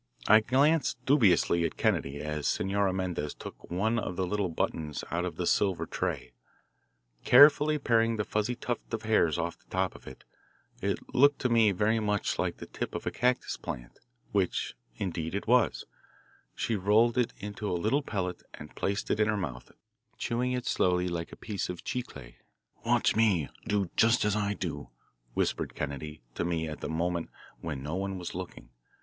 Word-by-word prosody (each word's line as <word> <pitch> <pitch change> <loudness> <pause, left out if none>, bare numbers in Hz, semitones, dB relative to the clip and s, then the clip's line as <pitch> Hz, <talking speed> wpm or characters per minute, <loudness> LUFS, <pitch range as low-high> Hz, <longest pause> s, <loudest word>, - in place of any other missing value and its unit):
I 110 +1 +8
glanced 140 +8 +2
dubiously 95 - +4
at - - -2
Kennedy 70 +1 0
as 75 -1 -2
Senora 100 0 +1
Mendez 90 -6 -3
took - - -10
one 110 +6 +1
of 95 - -4
the 95 - 0
little 100 0 -1
buttons 80 -2 -2
out 85 +1 0
of 90 -4 -4
the 90 - -2
silver 95 0 +2
tray. 60 - -3 0.9
Carefully 150 +1 +7
paring 115 -4 +2
the 105 - -1
fuzzy 105 +4 -1
tuft 120 0 -4
of 110 - -7
hairs 105 -8 +3
off - - -3
the - - -32
top - - 0
of - - -15
it 65 - -11 0.6
it 100 +5 -3
looked 140 +2 +5
to 125 - +1
me 115 -3 +5
very 105 +4 +2
much 105 -1 -1
like - - -1
the - - -8
tip - - -5
of - - -4
a - - -1
cactus 125 0 0
plant, - - -7 0.3
which, 95 -3 0 0.2
indeed, 85 +1 -3
it 100 - -3
was 120 0 +3 0.7
she 115 - -1
rolled 105 +4 +3
it 125 -1 +1
into 105 +1 -5
a 90 - 0
little 110 +11 +1
pellet 95 -9 -3
and 75 - -11
placed 100 +1 -1
it - - +1
in 105 - +4
her 105 -1 +1
mouth, 65 -11 -5 0.5
chewing 125 +2 -1
it 125 -1 -2
slowly 90 0 +2
like 85 -1 -4
a - - -9
piece 105 -5 -4
of 90 -1 -6
chicle. 70 - -5 0.5
"Watch - - +2
me; 100 -10 +3 0.2
do 100 -3 0
just 115 0 +4
as 105 -1 +2
I 105 -1 0
do," - - -5 0.5
whispered - - -1
Kennedy 75 -1 -5
to - - -2
me 85 -2 -1
at 75 - -7
a - - -2
moment 85 +1 -1 0.3
when 75 -5 -5
no 75 +3 -4
one 95 0 -2
was 90 -1 -6
looking. 90 -8 -8
100 Hz, 180 wpm, -29 LUFS, 85-115 Hz, 0.9 s, I